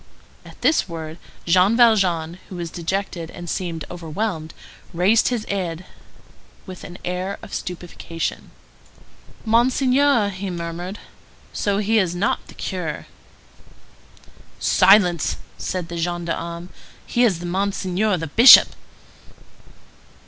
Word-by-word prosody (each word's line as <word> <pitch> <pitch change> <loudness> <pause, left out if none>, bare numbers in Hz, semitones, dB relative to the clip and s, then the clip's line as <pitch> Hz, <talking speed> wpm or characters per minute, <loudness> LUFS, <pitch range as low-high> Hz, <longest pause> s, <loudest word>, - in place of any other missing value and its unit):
At - - -15
this 315 - +2
word, 160 0 -7 0.3
Jean 185 +6 +4
Valjean, 185 -8 +3
who 185 - -8
was 170 -2 -5
dejected 175 -1 -3
and 175 0 -9
seemed 165 -3 -4
overwhelmed, 170 -1 -4 0.4
raised 195 +6 +3
his 240 -4 -2
head 180 -3 -4 0.8
with 185 -2 -10
an 180 - -9
air 180 +2 -3
of - - -11
stupefaction. 175 -2 -5 1.0
"Monseigneur!" 250 +1 +3
he 195 0 -5
murmured. 175 +2 -5 0.6
"So 200 -1 0
he 215 +2 +2
is 180 -3 0
not 185 +4 -1
the - - -14
curé?" - - -4 1.5
"Silence!" 185 -4 +4 0.2
said 180 -3 -3
the 170 - -6
gendarme. 170 0 -4 0.4
"He 240 - +1
is 180 -7 +1
Monseigneur 195 +2 0
the 165 - -4
Bishop." 230 - +9
180 Hz, 110 wpm, -21 LUFS, 170-205 Hz, 1.5 s, Bishop